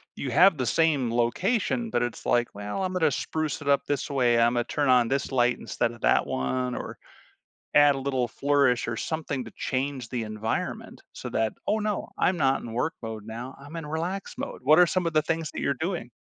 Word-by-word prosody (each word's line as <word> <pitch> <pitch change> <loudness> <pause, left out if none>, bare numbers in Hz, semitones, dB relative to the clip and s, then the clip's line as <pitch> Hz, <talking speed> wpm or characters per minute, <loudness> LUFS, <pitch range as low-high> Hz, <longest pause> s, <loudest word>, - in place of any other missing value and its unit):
you 135 - -4
have 175 +5 +6
the 130 - -1
same 145 -4 +2
location, 195 - 0
but 120 - 0
it's 120 -1 -5
like, 120 0 +2
"Well, 105 - -4
I'm 185 0 -2
gonna 160 -5 +2
spruce 155 +3 -2
it 145 - -8
up 140 - +4
this 145 0 -1
way. 125 -4 +2
Imma 120 +1 +3
turn 145 -3 0
on 125 -2 +5
this 135 +3 -1
light 125 -2 +2
instead 120 -1 -1
of 120 -1 -13
that - - +3
one." 125 - -1
Or - - -6 0.8
add 145 -1 +7
a - - -3
little 135 -2 0
flourish 140 -2 +2
or 115 - -2
something 145 -4 -3
to - - -11
change 130 -2 -2
the 120 -1 -3
environment 110 +1 -4
so - - -7
that, 110 -1 0
"Oh, 215 - +2
no, 210 -1 -2
I'm 185 - +2
not 135 -4 +2
in 115 - -7
work 125 +8 -1
mode 110 -2 -6
now, 120 +4 -7
I'm 145 +4 -10
in 165 -2 -5
relax 170 +6 -3
mode." - - -5
What 155 +4 +6
are 180 - +8
some 180 0 0
of 165 - 0
the 155 - +4
things 165 0 -2
that - - -5
you're 140 - +1
doing? 175 -6 -3
135 Hz, 220 wpm, -26 LUFS, 120-160 Hz, 0.8 s, are